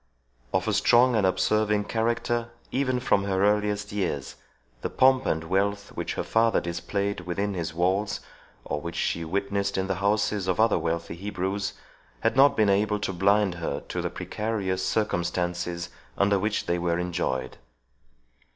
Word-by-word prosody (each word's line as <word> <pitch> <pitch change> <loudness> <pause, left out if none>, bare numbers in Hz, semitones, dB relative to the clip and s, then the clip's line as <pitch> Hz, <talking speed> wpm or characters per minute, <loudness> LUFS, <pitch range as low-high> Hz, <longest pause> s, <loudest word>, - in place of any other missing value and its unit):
Of 95 +2 0
a 110 - +1
strong 120 +5 +5
and 100 -4 +3
observing 105 +3 +2
character, 115 +1 -1 0.2
even 130 -2 +1
from 100 -5 +2
her 95 0 +1
earliest 105 0 +1
years, 95 -9 -2 0.5
the - - -2
pomp 130 0 +4
and 80 0 0
wealth 100 +3 0
which - - -4
her - - -2
father 115 0 +3
displayed 100 +4 -2
within 95 +3 -2
his 85 -3 -4
walls, 95 +4 +1 0.5
or 75 - -3
which 85 +2 -6
she 85 - -1
witnessed 100 +3 -1
in 95 - 0
the 95 -1 -2
houses 100 -1 +1
of 95 +1 0
other 110 0 +4
wealthy 85 0 -2
Hebrews, 95 +1 -3 0.5
had 115 0 +1
not 135 +1 +6
been 105 -2 +4
able 105 +2 +2
to 95 - -2
blind 100 +1 +3
her 70 -3 -2
to - - -2
the - - -2
precarious 100 -4 -2
circumstances 90 -3 -1 0.3
under 100 0 +3
which 105 +2 -1
they 85 0 0
were 85 -1 0
enjoyed. 85 -8 -2
100 Hz, 160 wpm, -26 LUFS, 90-105 Hz, 0.5 s, not